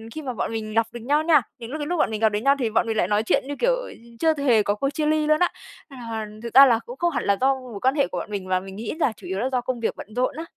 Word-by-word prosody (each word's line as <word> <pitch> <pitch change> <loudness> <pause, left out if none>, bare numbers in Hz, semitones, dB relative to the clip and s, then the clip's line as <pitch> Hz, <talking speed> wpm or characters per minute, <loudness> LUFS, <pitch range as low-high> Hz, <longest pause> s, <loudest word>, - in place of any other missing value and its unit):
khi 315 - -4
mà 265 -4 -4
bọn 225 - -3
mình 215 -1 -4
gặp 225 0 +2
được 240 - -8
nhau 290 +6 +1
nha, 315 -3 +5 0.2
những 230 +1 -9
lúc 310 - -4
cái 295 - -3
lúc 355 - -1
bọn - - +2
mình 215 - -4
gặp 220 - +5
được 205 0 -2
nhau 275 +5 +3
thì 240 -4 0
bọn 225 +1 +1
mình 225 - -1
lại 175 - +2
nói 210 +2 +1
chuyện 225 - +1
như, 285 - -4
kiểu, - - +3
ừ, - - -7 0.3
chưa 320 -1 +3
hề 245 -7 +3
có 205 0 0
cuộc 275 +6 -1
chia 305 +1 -2
ly 305 0 +1
luôn 305 0 +3
á. 355 - +3 0.4
À, 230 -5 -6 0.2
thực 235 - -6
ra 275 +1 +10
là, 235 -4 +3
cũng 245 - -9
không 345 +2 +1
hẳn 240 - -2
là 200 -1 +2
do 270 +1 +3
mối 250 -6 -9
quan 260 +4 +2
hệ 280 - +2
của - - -6
bọn 210 - -7
mình, 195 -2 -4
mà 185 - +2
mình 190 +1 -10
nghĩ 220 +2 -5
là 260 - +2
chủ - - -11
yếu 190 - -3
là 255 +4 0
do 250 -1 0
công 250 0 -3
việc 230 - -1
bận - - -9
rộn 255 +2 0
á. 325 - -5
250 Hz, 350 wpm, -23 LUFS, 220-285 Hz, 0.4 s, ra